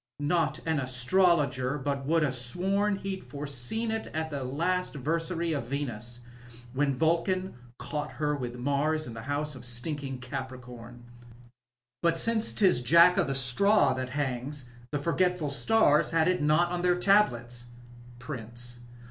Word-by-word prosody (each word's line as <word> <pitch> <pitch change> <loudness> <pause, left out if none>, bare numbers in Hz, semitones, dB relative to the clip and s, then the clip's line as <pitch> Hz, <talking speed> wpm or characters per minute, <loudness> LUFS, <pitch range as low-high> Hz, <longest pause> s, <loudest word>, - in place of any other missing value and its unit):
Not 160 +3 0
an 160 -2 +1
astrologer, 135 0 +2
but 140 -1 -3
would 165 0 +3
ha* 145 - +1
sworn 190 +12 0
he'd 195 -1 -5
foreseen 140 - -3
it 225 0 -3
at 160 0 -2
the 140 -2 -3
last 170 +7 -1
versary 165 +3 -1
of 130 -5 -4
Venus, 120 -3 -4 0.5
when 140 +1 +1
Vulcan 170 +6 0 0.2
caught 150 -1 -4
her 150 -1 -1
with 125 -3 -5
Mars 145 +4 0
in 120 - -7
the 115 - -7
house 145 +4 -2
of 130 -3 -10
stinking 135 +3 -3
Cai>ncom. 125 -2 -8 1.0
But 170 -1 +2
since 225 +4 +2
'tis 185 - +3
Jack 170 +7 +6
of - - +2
the 135 - -2
Straw 135 +4 +4
that 130 0 -4
hangs, 135 0 -3 0.2
the 145 - -1
forgetful 170 0 0
stars 150 -2 +3
nad 165 -1 +3
it 180 -2 +1
not 155 +4 +3
on 175 0 -1
their 180 0 +2
tablets. 120 - +2 0.5
PRINCB. 120 -2 -5
145 Hz, 150 wpm, -28 LUFS, 130-170 Hz, 1.0 s, Jack